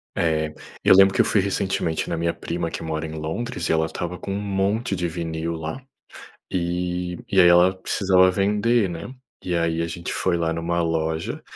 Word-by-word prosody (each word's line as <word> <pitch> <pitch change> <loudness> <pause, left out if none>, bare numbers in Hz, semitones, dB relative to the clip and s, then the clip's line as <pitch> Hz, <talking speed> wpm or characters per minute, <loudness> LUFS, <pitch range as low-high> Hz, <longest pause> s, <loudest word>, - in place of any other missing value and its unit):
eh, 80 -2 0 0.3
eu - - +7
lembro 95 0 +7
que - - -3
eu - - +2
fui 100 - +3
recentemente 95 -4 -1
na 85 - -1
minha 85 0 0
prima, 85 -1 -4
que - - -5
mora 80 0 -3
em 80 - -6
Londres, 80 +4 -4
e - - +2
ela 80 0 +2
estava 85 +2 -5
com 100 - -6
um 100 - -2
monte 100 +2 0
de 90 -1 -1
vinil 80 0 -3
lá, 80 +11 -6 0.7
e 90 0 -2
e 95 - +4
aí 90 - +8
ela 90 +2 +6
precisava 95 -1 +3
vender, 105 +2 +2
né, 85 +9 -7 0.3
e 90 -1 -1
aí 85 0 0
a 85 - -1
gente 85 0 -5
foi 90 -2 0
lá 85 -1 0
em 85 - -2
uma 85 +1 0
loja, 80 0 -2
85 Hz, 205 wpm, -23 LUFS, 80-95 Hz, 0.7 s, aí